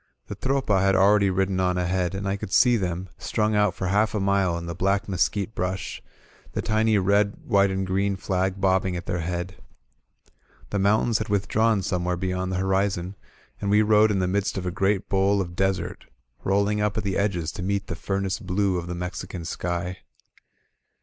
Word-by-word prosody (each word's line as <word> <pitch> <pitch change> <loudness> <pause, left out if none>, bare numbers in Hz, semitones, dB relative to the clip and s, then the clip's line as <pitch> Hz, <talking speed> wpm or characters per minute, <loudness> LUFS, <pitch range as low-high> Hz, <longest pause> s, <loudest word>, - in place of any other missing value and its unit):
The - - -4
Tropa 130 -8 +1
had 95 0 +3
already 100 +1 +4
ridden 95 0 0
on 90 -1 +1
ahead, 90 +1 0
and 100 +1 -3
I 95 - 0
could 100 - -7
see 120 +3 +5
them, 90 -3 -2
strung 110 0 0
out 105 -2 +2
for 95 - -4
half 105 +4 +1
a - - +1
mile 95 -3 +1
in 85 - -6
the 85 - -4
black 100 +3 0
mes 95 -3 +2
quite 105 +1 -4
brush, 90 -1 -3 0.5
the - - -1
tiny 110 0 +2
red 100 +1 +2
white 100 0 +3
and 95 0 -1
green 100 +1 0
flag 95 0 -1
bobbing 95 -1 +1
at 85 - -7
their 90 - -2
head. 90 +1 -4 1.1
The 100 - 0
mountains 105 +3 +2
had - - -4
withdrawn 105 +1 +1
some 90 -1 -1
where 90 0 0
beyond 95 0 -2
the 95 - -1
horizon, 95 -1 0 0.4
and 100 - -2
we 105 +1 +5
rode 105 0 +5
in 105 - +1
the 95 -1 +1
midst 100 +2 -1
of 95 - -3
a 90 - -1
great 95 +1 0
bowl 100 +1 +2
of 85 -2 -4
desert, 95 0 -1 0.4
rolling 100 +2 +1
up 105 0 0
at 110 - -1
the 100 -2 -1
edges 90 -5 0
to - - -7
meet 100 +2 -1
the 85 - -5
furnace 95 +1 -2
blue 95 0 0
of 85 - -7
the 90 - -4
Mexican 90 0 -5
sky. 90 +2 -3
95 Hz, 200 wpm, -25 LUFS, 90-100 Hz, 1.1 s, see